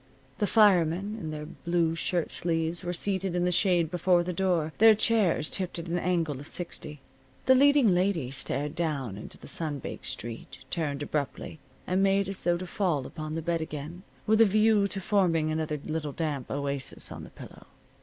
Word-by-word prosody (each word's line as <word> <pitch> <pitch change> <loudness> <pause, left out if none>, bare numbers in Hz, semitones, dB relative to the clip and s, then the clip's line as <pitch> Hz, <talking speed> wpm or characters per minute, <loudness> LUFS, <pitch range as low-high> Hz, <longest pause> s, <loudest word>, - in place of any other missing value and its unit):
The 205 - +2
firemen, 195 -1 +3
in 160 - -5
their 150 0 -5
blue 170 0 -1
shirt 170 0 -1
sleeves, 165 0 -1
were 175 - -2
seated 190 0 -2
in 175 0 +1
the 180 - +2
shade 175 -3 +2
before 175 0 +3
the 180 +1 -3
door, 170 -4 0
their 220 0 +8
chairs 205 -8 +2
tipped 185 -3 -1
at 170 - -5
an 175 +1 -1
angle 165 -6 0
of 145 - -9
sixty. 150 -4 -6 0.4
The 260 - +7
leading 275 -5 +5
lady 175 -8 0
stared 140 +2 -3
down 150 - -2
into 105 - -9
the - - -14
sun 155 -3 -1
baked - - -7
street, 115 0 -6
turned 145 -4 -2
abruptly 150 +1 -4 0.3
and 185 +1 +1
made 195 0 +3
as 195 -1 -6
though 175 0 +2
to 185 - -6
fall 175 -8 -1
upon 155 -1 -6
the 165 - -3
bed 170 0 0
again, 155 +3 -6 0.2
with 220 +1 +4
a - - +9
view 215 0 +3
to 195 0 -5
forming 175 -5 +1
another 155 -1 -2
little 155 -2 -3
damp 145 -5 -3
oasis 140 -1 -2
on - - -7
the - - -10
pillow. - - -13
170 Hz, 190 wpm, -28 LUFS, 155-190 Hz, 0.4 s, a